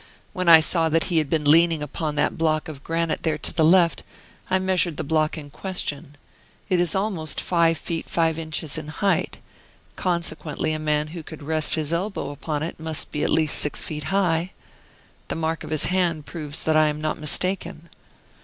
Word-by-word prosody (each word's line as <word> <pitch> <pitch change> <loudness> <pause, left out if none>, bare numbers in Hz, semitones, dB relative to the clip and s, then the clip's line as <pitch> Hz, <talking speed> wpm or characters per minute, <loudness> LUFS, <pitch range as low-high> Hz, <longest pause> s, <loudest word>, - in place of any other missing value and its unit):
When 185 -3 0
I 165 -1 +10
saw 165 0 +2
that 165 +1 +3
he 165 - +5
had 155 -3 -1
been 155 -1 0
leaning 165 +1 +4
upon 150 +1 -3
that 145 - +1
block 155 -1 0
of 145 -3 -9
granite 165 0 -1
there 155 -2 0
to - - -3
the 160 - +2
left, 170 -2 +4 0.5
I 185 - +3
measured 185 -4 +1
the - - -2
block 155 +1 +1
in 145 -2 -9
question. 145 -6 -4 0.5
It 185 - +2
is 175 -1 +1
almost 190 -6 -1
five 165 -2 +2
feet 165 +2 -5
five 165 -1 +1
inches 160 -1 -4
in 155 - -9
height, 195 +6 0 0.6
consequently 170 -4 -1
a 155 - -3
man 150 0 0
who 170 +1 -7
could 155 -1 -10
rest 155 +1 +2
his 155 0 -2
elbow 190 -2 -2
upon 150 +1 -3
it 165 - -5
must 160 -1 -4
be 150 - -2
at - - +1
least 155 -2 +2
six 150 - -1
feet 150 -2 -5
high. 180 0 0 0.7
The - - -3
mark 160 0 -2
of - - -8
his 155 -1 +2
hand 175 -5 0
proves 150 -3 -5
that 155 - +2
I 155 0 +5
am 150 0 -2
not 155 0 -2
mistaken. 170 +1 -2
160 Hz, 195 wpm, -24 LUFS, 155-170 Hz, 0.7 s, I